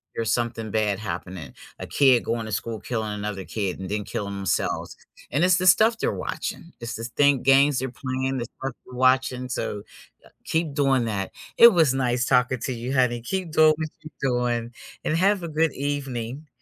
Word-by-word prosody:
there's 115 -1 -1
something 115 -3 -2
bad 105 -3 +1
happening, 90 -4 -6 0.2
a - - -6
kid 130 -4 +4
going 115 -1 -2
to 110 - -6
school, 110 +1 -3
killing 110 -3 -3
another 105 -2 -4
kid, 100 -4 -3
and 95 - -5
then 105 0 -1
killing 100 0 -4
themselves, 95 -1 -2 0.3
and 145 +7 +1
it's 180 +1 +5
the 185 0 +1
stuff 220 +5 +6
they're - - +1
watching, 170 - -5
it's 115 -1 -5
this 115 +1 -5
thing 140 +1 +3
games 135 +1 +5
they're 130 0 -2
playing, 130 +1 -3
the 120 - -3
stuff 135 +2 -7
they're 125 - -12
watching, 130 0 +2
so 105 -4 -3 0.6
keep 160 -3 -1
doing 135 -4 +2
that. 100 -3 -2 0.3
It 235 0 +10
was 160 -7 +4
nice 125 -2 0
talking 125 0 +2
to 130 - -2
you, 120 +2 -5
honey, 120 -3 +2
keep 185 +4 -3
doing 155 -1 +6
what 155 -1 -3
you 155 - -10
doing 120 -2 -1 0.3
and 155 - +1
have 195 0 +2
a - - -3
good 160 0 +1
evening. 140 -1 -4
125 Hz, 190 wpm, -24 LUFS, 115-145 Hz, 0.6 s, It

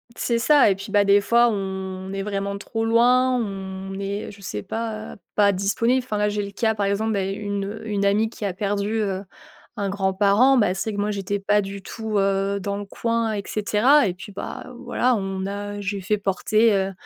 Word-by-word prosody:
C'est 235 -1 0
ça. 280 +1 +5
Et 195 - +2
puis, 195 +1 -9
bah, 205 -1 +4
des 200 0 +5
fois, 235 +3 +4
on 190 -2 -4
est 195 - -2
vraiment 200 0 -3
trop 225 +2 -3
loin. 250 +3 +4
On 195 -3 -5
est, 200 +2 -4
je 200 - -15
sais 105 - -5
pas, 220 -1 -4
heu, - - -13 0.2
pas 205 -1 +5
disponible. 230 +7 +1
Enfin 215 -5 -3
là, 210 0 +2
j'ai 205 0 -2
le 200 - -6
cas, 220 +2 0
par 205 -1 0
exemple, 210 +3 0
beh, 195 -1 -1
une, 205 -1 -3
heu, 220 +2 -7
une 200 -1 0
amie 210 +3 +2
qui 215 - -6
a 190 - -1
perdu, 205 +3 -1
heu, 195 -1 -2 0.5
un 200 -1 -1
grand 190 -1 0
parent, 210 +7 +4
bah, 195 -5 +3
c'est 205 +3 -3
que 205 - -4
moi, 205 +1 0
j'étais 200 0 -2
pas 205 +1 +2
du 195 0 -6
tout, 220 +1 -4
heu, 195 0 +1
dans 200 +1 -2
le 205 - -5
coin, 230 +2 -1
et 200 -1 -3
cetera. 225 +6 +3
Et 180 - -1
puis 185 +3 -11
bah, 195 - -7
voilà, 245 0 +1
on 195 -1 -3
a 205 +1 -5
j'ai 200 0 -3
fait 210 +3 0
porter, 215 +3 +2
heu, 195 0 +1
205 Hz, 220 wpm, -23 LUFS, 195-220 Hz, 0.5 s, ça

